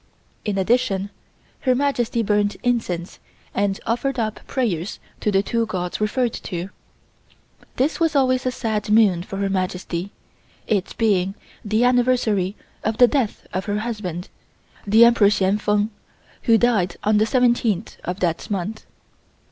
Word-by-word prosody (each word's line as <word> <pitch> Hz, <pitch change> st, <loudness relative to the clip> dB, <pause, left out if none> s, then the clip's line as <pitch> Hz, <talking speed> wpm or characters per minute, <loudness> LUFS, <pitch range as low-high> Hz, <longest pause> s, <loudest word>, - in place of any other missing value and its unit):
In 205 Hz, -2 st, -1 dB
addition, 200 Hz, -1 st, +1 dB, 0.5 s
Her 255 Hz, -2 st, +2 dB
Majesty 245 Hz, -4 st, 0 dB
burned 205 Hz, -1 st, +1 dB
incense 195 Hz, -8 st, -1 dB, 0.3 s
and 200 Hz, -1 st, 0 dB
offered 260 Hz, +3 st, -1 dB
up 220 Hz, -2 st, -2 dB
prayers 205 Hz, -, -1 dB, 0.2 s
to 210 Hz, -, 0 dB
the 195 Hz, 0 st, +3 dB
two 230 Hz, +1 st, 0 dB
gods 180 Hz, -2 st, -3 dB
referred 235 Hz, +2 st, +1 dB
to. 180 Hz, -1 st, -5 dB, 1.1 s
This 280 Hz, +8 st, 0 dB
was 325 Hz, -2 st, +1 dB
always 255 Hz, -2 st, +2 dB
a -, -, +1 dB
sad 220 Hz, -3 st, -2 dB
moon 210 Hz, -5 st, +4 dB
for 195 Hz, +2 st, -7 dB
Her 200 Hz, 0 st, 0 dB
Majesty, 185 Hz, -1 st, -2 dB, 0.5 s
it 200 Hz, -3 st, -1 dB
being 195 Hz, -4 st, +1 dB, 0.3 s
the 215 Hz, +3 st, +1 dB
anniversary 240 Hz, -6 st, +2 dB, 0.3 s
of 220 Hz, +1 st, -1 dB
the 245 Hz, -, +7 dB
death 255 Hz, -5 st, -1 dB
of 185 Hz, 0 st, -2 dB
her 205 Hz, 0 st, -1 dB
husband, 200 Hz, -7 st, -4 dB, 0.6 s
the 220 Hz, +3 st, +7 dB
Emperor 235 Hz, -4 st, +5 dB
Hsien 200 Hz, 0 st, +1 dB
Feng, 210 Hz, +1 st, +1 dB, 0.5 s
who 230 Hz, -2 st, +6 dB
died 210 Hz, -7 st, +2 dB
on 210 Hz, 0 st, +3 dB
the 215 Hz, -, +4 dB
17th 235 Hz, -5 st, +1 dB
of 180 Hz, +2 st, -4 dB
that 170 Hz, -2 st, -1 dB
month. 205 Hz, +2 st, -4 dB
210 Hz, 145 wpm, -22 LUFS, 195-240 Hz, 1.1 s, the